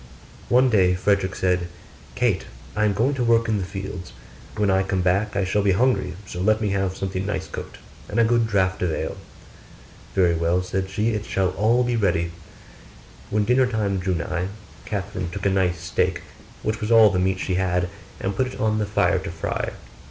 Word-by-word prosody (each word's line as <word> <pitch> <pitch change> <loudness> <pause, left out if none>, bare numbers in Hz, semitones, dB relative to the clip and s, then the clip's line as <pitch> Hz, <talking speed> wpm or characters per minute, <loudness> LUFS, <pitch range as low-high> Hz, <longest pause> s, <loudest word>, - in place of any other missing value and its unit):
One 125 +1 +4
day 90 -4 +4
Frederick 100 0 +1
said. 90 -1 +1 0.5
'Kate! - - +1 0.3
I 105 - +2
am 105 - +2
going 120 +8 +1
to 130 -3 -1
work 115 0 +3
in 110 -2 +1
the - - -2
fields; 95 -1 -7 0.4
when 105 -2 +2
I 95 0 +3
come 95 -1 -1
back 100 +4 +1
I 100 - +1
shall 95 +2 +1
be 100 -1 +3
hungry 110 -4 +1
so 90 -1 -6
let 110 +3 +3
me 105 -2 0
have 95 -1 -1
something 95 -1 -3
nice 100 -2 -3
cooked, - - -7 0.3
and - - -1
a - - +6
good 115 0 +3
draught 95 -3 +1
of 90 -2 +1
ale.' - - -3 1.0
'Very 90 -3 +4
well,' 85 +2 +1
said 95 +1 -2
she, 105 +4 0
'it 105 -2 -2
shall 95 -1 +1
all 115 +6 +2
be 120 -1 0
ready.' 85 -6 +1 1.0
When 105 0 +1
dinner 125 +3 +4
time 105 -5 -1
drew 90 0 0
nigh, 85 +2 -2 0.4
Catherine 95 -4 -3
took 85 - -6
a 100 - +3
nice 90 -3 +1
steak, 90 +1 -1 0.4
which 110 +1 -2
was 105 - -2
all 110 -3 +7
the 90 - 0
meat 95 +1 +1
she 95 - -2
had, 90 -1 +1 0.3
and 95 0 -2
put 130 - +1
it 125 - -8
on 110 0 +1
the 105 - -1
fire 100 -3 +2
to 95 +1 -6
fry. 85 -2 -3
95 Hz, 205 wpm, -23 LUFS, 90-110 Hz, 1.0 s, all